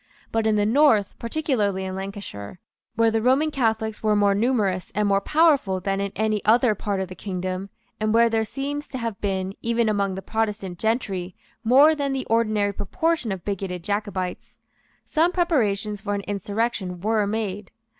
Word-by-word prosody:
But 225 -1 +1
in 215 - +3
the 205 -1 +2
north, 225 -4 +4
particularly 230 -8 -1
in 190 - -4
Lancashire, 190 - -7 0.4
where 230 0 +3
the 225 0 +1
Roman 270 +6 +3
Catholics 220 -5 -1
were 215 -1 +2
more 205 -1 +4
numerous 205 -4 0
and 210 0 +2
more 195 0 +3
powerful 285 - +3
than 195 +1 -1
in 200 -1 -2
any 215 -1 0
other 230 +1 +4
part 200 -1 -3
of 190 - -2
the 185 - -8
kingdom, 185 +1 -4 0.3
and 215 0 0
where 230 +1 +5
there 225 -1 +1
seems 285 +6 -4
to 260 - -6
have 230 -4 -4
been, 190 -1 -1
even 235 0 +1
among 200 -3 0
the 190 - -6
Protestant 210 -5 -2
gentry, 195 -6 -1 0.3
more 275 +7 +6
than 280 -3 -1
the 265 -1 -2
ordinary 215 -3 +2
proportion 315 - -1
of 190 -2 -5
bigoted 190 -3 -3
Jacobites, 200 -2 -3 0.5
some 330 +2 +2
preparations 215 - 0
for 205 0 -2
an 200 - -2
insurrection 200 -1 -2
were 215 +1 +1
made. 205 -2 -3
210 Hz, 175 wpm, -24 LUFS, 195-230 Hz, 0.5 s, more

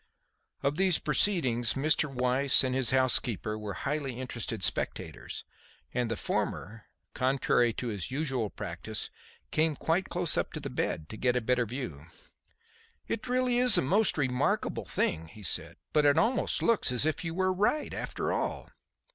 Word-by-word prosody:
Of 140 +2 0
these 185 -3 +3
proceedings 140 - +1
Mr. 150 +1 +2
Weiss 130 +2 +3
and 130 -1 -1
his 130 -3 +2
housekeeper 125 -5 +2
were 105 -3 -6
highly 140 -3 -3
interested 120 -5 -4
spectators, - - -4 0.5
and 125 -2 -1
the 115 - -2
former, 105 +3 -3 0.3
contrary 130 -2 +1
to 125 - -4
his 100 -4 -1
usual 130 -5 -2
practice, - - -6 0.4
came 155 -1 +1
quite 165 +6 -1
close 175 -1 +3
up - - -1
to - - -4
the - - -6
bed, 75 - -2
to 110 - -8
get 125 +1 +1
a - - +3
better 125 0 +1
view. 100 - -6 1.0
"It 220 - -3
is - - -8
really 250 -1 +1
a 245 -7 +8
most 200 +9 +3
remarkable 130 -3 -1
thing," 80 -1 -1
he 105 +5 -14
said, 90 - 0 0.2
"but 150 - +3
it 145 -1 +4
almost 245 +3 +1
looks 230 - +3
as 125 +3 +3
if 155 +1 -1
you 165 -1 -4
were 185 0 +1
right, 210 +11 0
after - - -3
all. - - -3
130 Hz, 165 wpm, -29 LUFS, 120-165 Hz, 1.0 s, a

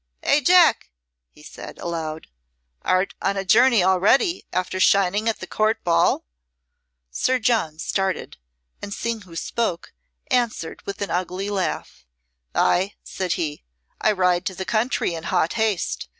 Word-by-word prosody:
"Eh, 290 - +4
Jack!" 345 - +5 0.4
he - - -19
said, - - -10
aloud, 160 -2 -4 0.6
"art 185 +1 +1
on 195 0 0
a 195 - -2
journey 235 +1 +5
already, 200 - +3
after 185 +1 -2
shining 200 +3 +3
at 225 - -2
the - - -6
Court 220 +1 0
ball?" 170 - +2 0.9
Sir 255 - +1
John 220 -10 0
started, 190 +3 -2 0.4
and 200 -1 -5
seeing 230 -1 -3
who 180 -4 -14
spoke, 180 0 -3 0.4
answered 235 -9 -1
with 200 0 -4
an 200 - -5
ugly 185 +3 -2
laugh. 190 - -3 0.5
"Ay," 190 +3 +2
said 185 -3 -3
he, 150 -3 -4 0.4
"I 215 - +4
ride 180 -3 +2
to 190 - -4
the 190 - -5
country 220 -4 0
in 165 0 -6
hot 165 - +1
haste. 220 -5 -1
195 Hz, 145 wpm, -23 LUFS, 175-220 Hz, 0.9 s, Jack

